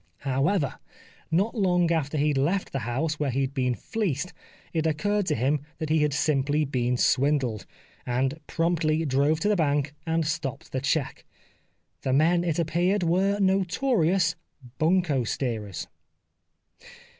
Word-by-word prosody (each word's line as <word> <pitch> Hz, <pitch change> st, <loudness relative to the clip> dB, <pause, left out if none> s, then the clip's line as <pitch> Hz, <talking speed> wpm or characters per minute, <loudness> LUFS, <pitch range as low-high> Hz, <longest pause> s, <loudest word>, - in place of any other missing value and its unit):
However, 140 Hz, +3 st, 0 dB, 0.5 s
not 190 Hz, +7 st, +1 dB
long 180 Hz, -6 st, +2 dB
after 155 Hz, -2 st, 0 dB
he 150 Hz, +1 st, +2 dB
had 145 Hz, -, 0 dB
left 180 Hz, +8 st, 0 dB
the 135 Hz, -, -2 dB
house 150 Hz, +5 st, -1 dB
where 145 Hz, -2 st, 0 dB
he 135 Hz, +2 st, 0 dB
had 135 Hz, 0 st, -2 dB
been 125 Hz, -3 st, 0 dB
fleeced 180 Hz, -, -3 dB, 0.4 s
it 160 Hz, -1 st, +1 dB
occurred 205 Hz, +6 st, 0 dB
to -, -, +1 dB
him 135 Hz, +5 st, +1 dB, 0.2 s
that 155 Hz, -, -4 dB
he 160 Hz, -, +4 dB
had 150 Hz, -1 st, +2 dB
simply 145 Hz, +1 st, +1 dB
been 125 Hz, -2 st, 0 dB
swindled, 130 Hz, -5 st, +1 dB, 0.4 s
and 130 Hz, +5 st, -1 dB
promptly 165 Hz, -1 st, +1 dB
drove 140 Hz, +3 st, +2 dB
to -, -, +1 dB
the 210 Hz, -, +3 dB
bank 145 Hz, -3 st, +1 dB
and 165 Hz, 0 st, +1 dB
stopped 145 Hz, -3 st, -4 dB
the 130 Hz, -, -2 dB
cheque. 140 Hz, 0 st, -1 dB, 0.8 s
The 130 Hz, -, -1 dB
men, 170 Hz, +5 st, +3 dB
it 165 Hz, -3 st, -1 dB
appeared 175 Hz, +4 st, +1 dB
were 190 Hz, +4 st, +2 dB
notorious 190 Hz, -2 st, +2 dB, 0.2 s
" 125 Hz, -3 st, -19 dB
bunco 160 Hz, -5 st, +2 dB
steerers." 110 Hz, -6 st, -3 dB
155 Hz, 150 wpm, -26 LUFS, 135-175 Hz, 0.8 s, he